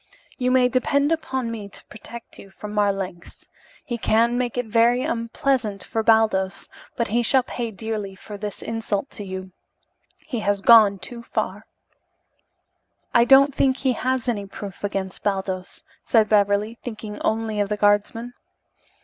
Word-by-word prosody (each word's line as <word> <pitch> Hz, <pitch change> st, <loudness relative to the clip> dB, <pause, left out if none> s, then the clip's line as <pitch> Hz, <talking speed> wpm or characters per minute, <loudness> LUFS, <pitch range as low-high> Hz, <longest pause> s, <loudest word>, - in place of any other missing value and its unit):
"You 250 Hz, 0 st, +1 dB
may 255 Hz, -1 st, +4 dB
depend 280 Hz, +4 st, +1 dB
upon 265 Hz, -7 st, -2 dB
me 210 Hz, -3 st, -6 dB
to -, -, -14 dB
protect 230 Hz, +2 st, -11 dB
you 195 Hz, -, -12 dB
from 210 Hz, +2 st, -9 dB
Marlanx. 195 Hz, -4 st, -2 dB, 0.4 s
He 240 Hz, -1 st, -4 dB
can 230 Hz, +2 st, +2 dB
make 245 Hz, -1 st, -2 dB
it 245 Hz, -, 0 dB
very 235 Hz, +3 st, +3 dB
unpleasant 230 Hz, -2 st, -1 dB
for 225 Hz, -, -2 dB
Baldos, 220 Hz, -4 st, +2 dB, 0.3 s
but 235 Hz, -2 st, -1 dB
he 235 Hz, +3 st, +2 dB
shall 255 Hz, +2 st, +3 dB
pay 240 Hz, -2 st, -4 dB
dearly 215 Hz, -2 st, -5 dB
for 210 Hz, +2 st, -10 dB
this 205 Hz, 0 st, -6 dB
insult 225 Hz, +1 st, -3 dB
to 205 Hz, -, -8 dB
you. 190 Hz, -1 st, -7 dB, 0.7 s
He 250 Hz, -7 st, -5 dB
has 205 Hz, -1 st, 0 dB
gone 215 Hz, -3 st, +7 dB
too 235 Hz, +5 st, -8 dB
far." 235 Hz, -, -4 dB, 1.5 s
"I 235 Hz, -1 st, +5 dB
don't 275 Hz, +2 st, +6 dB
think 265 Hz, -1 st, +2 dB
he 265 Hz, -2 st, +1 dB
has 255 Hz, +1 st, -1 dB
any 205 Hz, -5 st, -1 dB
proof 195 Hz, -1 st, -9 dB
against 195 Hz, -2 st, -3 dB
Baldos," 190 Hz, -2 st, -3 dB, 0.2 s
said 220 Hz, -2 st, +3 dB
Beverly, 210 Hz, +2 st, +2 dB
thinking 215 Hz, -3 st, -7 dB
only 220 Hz, -1 st, -1 dB
of 205 Hz, -1 st, 0 dB
the 210 Hz, -, -1 dB
guardsman. 210 Hz, +4 st, +1 dB
220 Hz, 155 wpm, -23 LUFS, 205-240 Hz, 1.5 s, gone